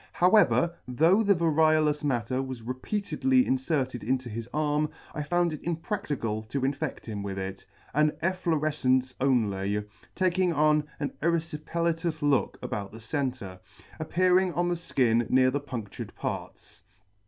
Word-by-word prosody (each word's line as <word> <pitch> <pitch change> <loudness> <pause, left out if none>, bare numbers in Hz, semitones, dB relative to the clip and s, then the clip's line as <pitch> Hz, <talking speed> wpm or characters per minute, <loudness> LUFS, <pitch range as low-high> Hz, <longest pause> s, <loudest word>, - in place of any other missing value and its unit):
However, 180 -2 +4
though 160 - +4
the 200 -2 +4
variolous 155 -2 +3
matter 130 -2 0
was 130 -3 -6
re 125 +3 -3
C 130 - -19
peatedly 210 -1 -2
C - - -5
>° - - -19
] - - -23
peatedly 260 -1 +4
inferted 130 -2 -1
into 130 +2 -1
his 115 +2 -6
arm, 150 0 +1 0.2
I 155 - -3
found 175 +2 +1
it 155 - -7
impracticable 165 - -2
to 120 +5 -4
infedt 140 +2 -2
him 105 -3 -5
with 100 -1 -4
it; 95 0 -6 0.3
an 150 +2 +4
efflorefcence 150 -8 +1
only, 105 -6 +1 0.3
taking 185 -1 +2
on 150 0 +3
an 145 - -2
ervfipelatous 165 0 -1
look 145 -3 +2
about 100 -1 -4
the 115 - -10
centre, 120 -6 -3 0.4
appearing 180 +3 +2
on 175 +1 +1
the - - +1
ikin 120 -9 +1
near 130 0 +4
the 145 +2 -1
pundtured 120 -7 -7
parts. - - -6
145 Hz, 155 wpm, -28 LUFS, 125-170 Hz, 0.4 s, However